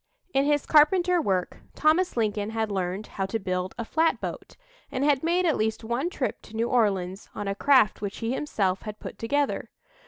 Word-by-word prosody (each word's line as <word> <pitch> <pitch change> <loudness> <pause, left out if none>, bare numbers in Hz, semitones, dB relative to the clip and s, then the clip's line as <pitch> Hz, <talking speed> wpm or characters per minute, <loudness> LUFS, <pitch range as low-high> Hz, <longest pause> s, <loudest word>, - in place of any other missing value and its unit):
In 275 +1 +3
his 290 -1 +2
carpenter 350 +3 +4
work, 185 - -1 0.2
Thomas 320 +1 +2
Lincoln 210 -2 0
had 220 -1 -2
learned 190 +1 -2
how 195 -1 -4
to 225 - -1
build 185 -2 -3
a 235 - -3
flatboat, 320 +7 -1 0.4
and 265 - -1
had 285 -2 +3
made 345 +2 +1
at 320 - +2
least 220 +1 -1
one 240 +9 -1
trip - - -3
to 220 - -13
New 230 +1 0
Orleans 195 -5 0
on 205 - -4
a 195 - 0
craft 240 -1 +3
which 200 -1 -4
he 230 +2 -2
himself 195 -10 -1
had 215 -1 -7
put - - -9
together. 285 +5 -1
225 Hz, 190 wpm, -26 LUFS, 200-295 Hz, 0.4 s, carpenter